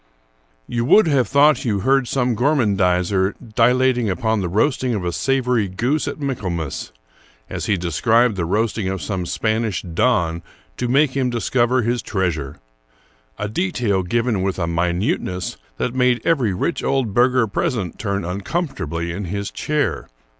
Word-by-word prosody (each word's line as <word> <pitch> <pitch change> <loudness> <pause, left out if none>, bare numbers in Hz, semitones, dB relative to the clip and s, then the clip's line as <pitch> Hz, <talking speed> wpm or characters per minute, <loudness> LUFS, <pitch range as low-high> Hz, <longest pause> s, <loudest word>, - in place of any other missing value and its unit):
You 120 - -2
would 195 - +6
have 140 -7 +2
thought 145 +5 +4
you 105 -6 0
heard 135 +1 +2
some 125 -1 0
gormandizer 100 - +1 0.2
dilating 125 0 +3
upon 110 +3 0
the 90 - -2
roasting 125 - +1
of 95 -4 -3
a 90 - 0
savory 125 +1 +1
goose 125 +11 -1
at 145 - -4
Michaelmas,* 90 - -3 0.6
as - - -4
he 100 - +2
described 110 +7 +2
the 90 -3 -1
roasting 110 +2 0
of 95 0 -2
some 90 +2 -3
Spanish 110 -1 -1
don 85 -2 +1 0.4
to 125 - -1
make 135 +2 +2
him 130 -2 +1
discover 120 +1 +1
his 120 +2 0
treasure, 80 - -2 0.4
— - - -34 0.3
a 105 - -3
detail 115 - 0
given 115 +2 0
with 95 0 -1
a 85 - -1
minuteness 90 +2 -1 0.2
that 125 - -2
made 125 -1 +2
every 135 -11 +2
rich 125 - -2
old 135 -6 0
burgher 125 +1 +3
present 110 - -2
turn 100 -4 -2
uncomfortably 90 - -3
in 95 +3 -4
his 100 +3 -4
chair. 150 -2 -1
110 Hz, 155 wpm, -20 LUFS, 95-125 Hz, 0.6 s, would